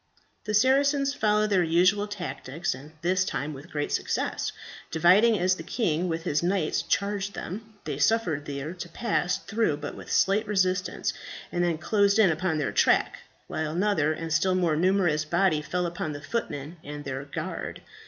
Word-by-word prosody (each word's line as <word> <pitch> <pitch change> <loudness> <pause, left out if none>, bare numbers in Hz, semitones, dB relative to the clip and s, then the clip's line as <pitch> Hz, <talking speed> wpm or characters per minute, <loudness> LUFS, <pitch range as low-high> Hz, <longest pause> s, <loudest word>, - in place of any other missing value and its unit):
The 210 0 0
Saracens 275 +4 +3
followed 215 -4 +2
their 190 -2 +4
usual 180 +5 +3
tactics, 175 -5 -4
and 140 +4 -11
this 185 +2 +2
time 155 -5 -3
with 140 +5 -11
great 145 -1 -3
success. - - -1 0.4
Dividing 195 +8 +5
as 185 +1 +2
the - - -6
king 175 -2 -1
with 165 0 -2
his 145 -2 0
knights 175 -2 +1
charged 200 0 -1
them, 220 +5 -7
they - - -4
suffered 170 -11 +1
these 145 +5 -5
to - - -6
pass 210 -6 0
through 220 -8 0
with 145 0 -6
but - - -10
slight 205 +3 +2
resistance, 185 -2 0 0.4
and 175 - 0
then 170 -2 +1
closed 200 +3 +2
in 205 -5 +6
upon 160 0 -1
their 150 - -1
track, - - +2 0.3
while 155 -1 -3
another 175 -4 +2
and 160 0 -3
still 185 +4 +2
more 175 -4 +2
numerous 175 -2 +2
body 170 0 +2
fell 180 +3 -2
upon 170 -3 -3
the 145 - -6
footmen 155 -5 -4
and 145 0 -7
their 135 0 -4
guard. 145 - -5
180 Hz, 175 wpm, -27 LUFS, 155-205 Hz, 0.4 s, in